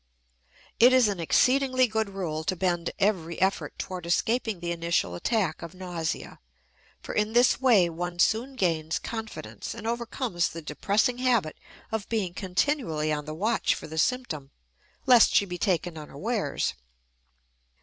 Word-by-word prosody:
It 245 +2 +7
is 255 -3 +6
an 200 -3 -2
exceedingly 255 - +3
good 220 -2 -1
rule 170 -5 -4
to 185 - 0
bend 175 -1 0
every 180 -5 0
effort 190 +2 0
toward 180 -3 -5
escaping 220 +3 0
the 170 0 -3
initial 170 - 0
attack 185 - -1
of 170 +2 -8
nausea, 175 -3 -4 0.6
for - - -6
in 210 +1 0
this 245 +1 +4
way 225 -9 +5
one 175 +1 -5
soon 230 +9 +1
gains 160 -7 0
confidence, 225 -1 -6
and - - -9
overcomes 235 -5 -1
the 165 - -7
depressing 210 - 0
habit 235 -11 +1 0.4
of 220 -2 -3
being 205 -6 -1
continually 180 - 0
on 150 -1 -3
the 155 0 -6
watch 220 +7 +1
for - - -8
the 160 +1 -5
symptom, 160 - -1 0.6
lest 245 -3 +6
she 200 - +5
be 180 -2 -6
taken 175 -3 0
unawares. 155 - -2
190 Hz, 150 wpm, -27 LUFS, 170-230 Hz, 0.6 s, It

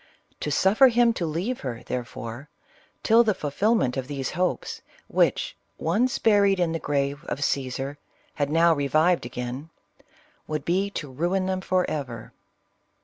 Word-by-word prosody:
To - - -3
suffer 200 - +5
him 240 -1 +4
to 175 -6 -2
leave 180 +11 -2
her, 120 -3 -5
therefore, 120 +2 -6 0.5
till 230 +1 +6
the 215 -4 +1
fulfilment 150 - +1
of 130 -1 -3
those 135 -2 -3
hopes, 180 +1 -2 0.3
which, - - +1 0.2
once 245 +3 +1
buried 200 -3 +4
in 175 -2 +1
the 165 - -2
grave 140 0 -1
of - - -3
Cassar, 135 0 -2 0.3
had 145 -1 -1
now 165 +2 +4
revived 155 +1 +2
again, 125 +5 -6 0.8
would 155 -1 -3
be 190 +4 +1
to 150 -8 -6
ruin 175 +7 0
them 185 0 -1
forever. 145 - -2
160 Hz, 145 wpm, -25 LUFS, 140-195 Hz, 0.8 s, till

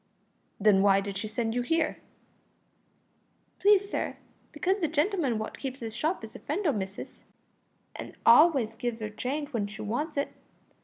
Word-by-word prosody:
"Then 200 -2 +5
why 195 -1 +5
did 200 0 -5
she 205 +3 -3
send 225 +1 -2
you 245 - 0
here?" 320 +5 0 1.6
"Please, 405 0 +5
sir, - - -3 0.3
because 380 +3 0
the 330 - +1
gentleman 305 - +1
wot 215 0 -5
keeps 270 -1 -5
this 225 -2 -5
shop 310 +5 -1
is 220 - -9
a - - -8
friend 365 +8 -3
o' 305 - +4
missis, 195 -4 -6 0.7
an' - - -8
always 250 -2 +6
gives 235 0 -3
'er 215 - -4
change 280 +7 -3
w'en 225 -7 -2
she 215 +1 -8
wants 290 +9 -3
it. 280 - -1
245 Hz, 165 wpm, -28 LUFS, 215-310 Hz, 1.6 s, always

